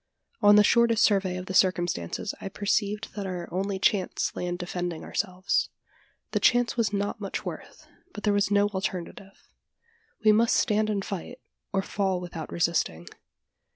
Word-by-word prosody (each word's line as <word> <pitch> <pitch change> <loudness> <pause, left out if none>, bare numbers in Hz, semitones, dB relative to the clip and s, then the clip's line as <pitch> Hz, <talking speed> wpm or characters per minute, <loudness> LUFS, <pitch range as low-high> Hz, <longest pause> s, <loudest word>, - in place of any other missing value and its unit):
On 205 0 +7
the 210 - +7
shortest 235 +1 +4
survey 190 -3 +2
of 180 - -6
the 190 - -5
circumstances 175 - +1
I 195 - -5
perceived 205 +2 -1
that 200 -2 -4
our 180 -2 -5
only 190 +2 -2
chance 190 -1 0
lay 180 - -3
in 175 0 -2
defending 175 -2 -4
ourselves. 185 -2 -1 0.6
The - - +1
chance 245 0 +3
was 230 -3 +1
not 205 +2 -2
much 195 - -4
worth; - - -8 0.3
but 210 - -9
there 210 - +2
was 205 0 +2
no 205 0 +3
alternative. 190 0 -6 0.8
We 215 - +8
must 225 +2 +3
stand 215 -1 +2
and 200 -2 -1
tight, 200 +6 -6 0.3
or 195 -1 0
fall 190 -2 -1
without 175 -3 -7
resisting. 160 - -1
195 Hz, 160 wpm, -27 LUFS, 180-210 Hz, 0.8 s, We